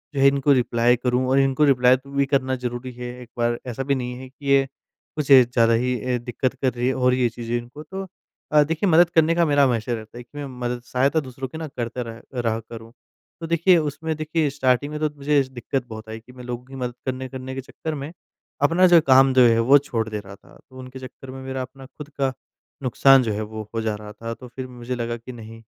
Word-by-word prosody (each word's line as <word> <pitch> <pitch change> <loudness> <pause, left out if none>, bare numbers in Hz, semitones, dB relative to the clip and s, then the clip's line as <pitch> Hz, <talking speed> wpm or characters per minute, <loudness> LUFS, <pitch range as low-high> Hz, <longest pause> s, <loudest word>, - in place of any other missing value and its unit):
जो - - -1
है 135 - +7
इनको 140 +1 +3
रिप्लाई 120 -1 +3
करूँ? 125 +1 0
और 135 - +4
इनको 135 +2 +2
रिप्लाई 125 -2 +5
तू 140 +2 -16
भी 140 0 +1
करना 135 -1 0
ज़रूरी 125 0 -5
है 125 0 -7
एक 125 - -12
बार। 120 0 0
ऐसा 125 +2 -3
भी 140 +1 +1
नहीं 125 -1 -4
है 130 0 -10
कि 140 +2 -16
ये 135 0 +4 0.5
कुछ 150 -2 -2
ज़्यादा 120 -3 +6
ही 125 +2 +1
अ, 125 +1 0
दिक्कत 120 +2 -2
कर 130 -2 -1
रही 120 +1 -1
है 130 - +2
और 125 -1 +2
ये 125 -2 +2
चीज़ें 120 0 -3
इनको 120 +5 -9
तो 190 +5 -7 0.4
अ, 150 -1 +6
देखिए 165 +6 -1
मदद 170 +1 +6
करने 165 -1 +3
का 170 - +3
मेरा 145 -2 +4
हमेशा 120 -2 +1
रहता 110 +1 -7
है 120 - -8
कि 145 +5 -16
मैं 145 - -4
मदद 120 0 -3
सहायता 135 +4 +1
दूसरों 130 -2 -6
की 145 - -9
ना 160 -1 -5
करता 125 -2 -5
रह 115 0 -9
रहा 115 -2 0
करूँ। 115 0 -11 0.5
तो 165 - -4
देखिए 170 +2 +4
उसमें 155 +1 -2
देखिए 155 -1 0
स्टार्टिंग 135 +1 +1
में 150 - -4
तो 155 - +1
मुझे 145 0 +2
दिक्कत 130 0 -3
बहुत 110 0 -9
आई 110 0 -6
कि 120 +3 -17
मैं 125 0 -11
लोगों 125 0 -6
की 135 +1 -12
मदद 125 -2 -3
करने 130 0 -3
करने 130 0 -7
के 135 - -4
चक्कर 155 +4 -6
में 140 +2 -6 0.5
अपना 170 +6 +5
जो 175 -1 +7
काम 135 0 +6
जो 130 - +5
है, 115 0 +3
वो 130 +5 +6
छोड़ 120 -6 -2
दे 105 -1 -3
रहा 100 -1 -11
था। - - -20
तो 130 - -14
उनके 130 +1 -9
चक्कर 130 0 -10
में 130 0 -8
मेरा 130 0 -4
अपना 130 +1 -9
खुद 145 +2 -11
का 135 -2 -1 0.5
नुकसान 135 +1 +5
जो 110 - -1
है, 105 - -3
वो 110 0 -6
हो 115 - 0
जा 110 -1 -1
रहा 105 0 -9
था। 115 +2 -6
तो 125 +2 -11
फिर 130 +1 -7
मुझे 125 0 -6
लगा 120 -1 -3
कि 115 +2 -10
नहीं, 115 -1 -11
130 Hz, 250 wpm, -23 LUFS, 120-140 Hz, 0.5 s, है